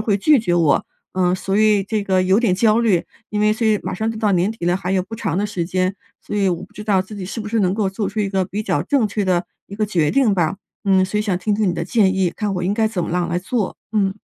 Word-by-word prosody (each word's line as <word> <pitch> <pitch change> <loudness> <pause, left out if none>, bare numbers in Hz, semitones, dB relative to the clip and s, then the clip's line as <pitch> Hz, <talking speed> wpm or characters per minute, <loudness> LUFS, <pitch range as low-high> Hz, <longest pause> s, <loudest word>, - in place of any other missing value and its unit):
会 215 -2 +1
拒 300 +7 +5
绝 215 -6 -1
我， 165 -5 +3 0.3
嗯。 180 -1 +2
所 195 +1 -2
以 215 -2 +4
这 210 0 -2
个 190 -2 +2
有 190 +2 +3
点 225 -6 +2
焦 215 +3 +3
虑。 205 -8 +2 0.3
因 210 0 -1
为 210 0 +4
所 225 0 -1
以 215 -2 +3
马 - - -3
上 220 +4 -1
就 220 - -7
到 215 -2 +1
年 185 +4 +2
底 200 -6 -5
了， 175 +1 +2
还 190 -1 -3
有 185 - +2
不 220 +5 -8
长 170 -4 -2
的 205 - 0
时 190 -5 -3
间， 185 +1 -1 0.3
所 - - -5
以 195 -2 +2
我 175 -1 -3
不 205 - -13
知 210 - -8
道 200 -3 +2
自 190 +3 -11
己 195 - -5
是 210 +5 -5
不 210 - -5
是 225 0 0
能 185 -2 +2
够 205 -1 0
做 195 +2 -3
出 215 +1 -2
一 200 - 0
个 190 -1 0
比 205 +4 -4
较 - - 0
正 275 -6 +1
确 205 0 -2
的 180 -1 +1 0.2
一 200 - -9
个 215 - +1
决 170 -7 +1
定 260 -7 +3
吧。 175 -1 0 0.3
嗯， 190 -2 +4
所 190 +3 -3
以 210 - +1
想 200 -4 0
听 205 +3 0
听 210 -2 +1
你 180 - +1
的 170 - -3
建 190 0 +2
议， 185 -2 +2
看 210 -2 -2
我 180 - -3
应 190 - +1
该 220 0 +2
怎 180 -6 -2
么 - - -5
样 175 -1 0
来 175 +1 0
做。 205 +2 -2 0.2
嗯。 195 -3 +1
195 Hz, 330 characters per minute, -20 LUFS, 185-215 Hz, 0.3 s, 拒